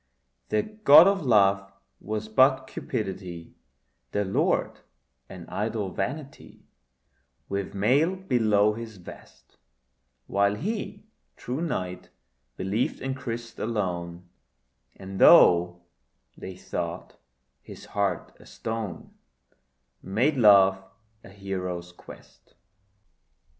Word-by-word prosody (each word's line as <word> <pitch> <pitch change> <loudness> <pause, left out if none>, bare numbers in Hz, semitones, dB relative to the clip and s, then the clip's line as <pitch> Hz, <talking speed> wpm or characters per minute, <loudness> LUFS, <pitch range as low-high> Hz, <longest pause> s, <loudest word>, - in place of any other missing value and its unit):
Their 105 - +1
god 195 -8 +6
of 195 -1 +2
love 100 -5 +3 0.3
was 110 0 -5
but 130 +4 +3
Cupidity, 95 -8 -6 0.6
Their 105 - 0
Lord 95 - 0 0.5
an 90 -3 -10
idol 105 -2 -3
vanity 135 - -6 0.8
With 100 0 -4
mail 140 - +2
below 110 - +2
his 110 -1 -9
vest: 90 - -15 0.7
While 100 +1 +1
he, 205 - -5 0.3
true 130 +5 -5
knight, 90 - -4 0.5
believed 100 +6 -2
in 135 0 -3
Christ 115 -3 -7
alone, 90 -5 -3 0.7
And 95 0 -8
though 90 0 +6 0.5
they 95 - -9
thought 85 -2 -6 0.4
his - - -12
heart 100 -4 -2
a - - -17
stone, 110 -6 -6 0.9
Made 120 +11 0
love 100 -5 +5 0.4
a - - -13
hero's 90 -3 -5
quest. 90 - -16
105 Hz, 95 wpm, -26 LUFS, 95-125 Hz, 0.9 s, god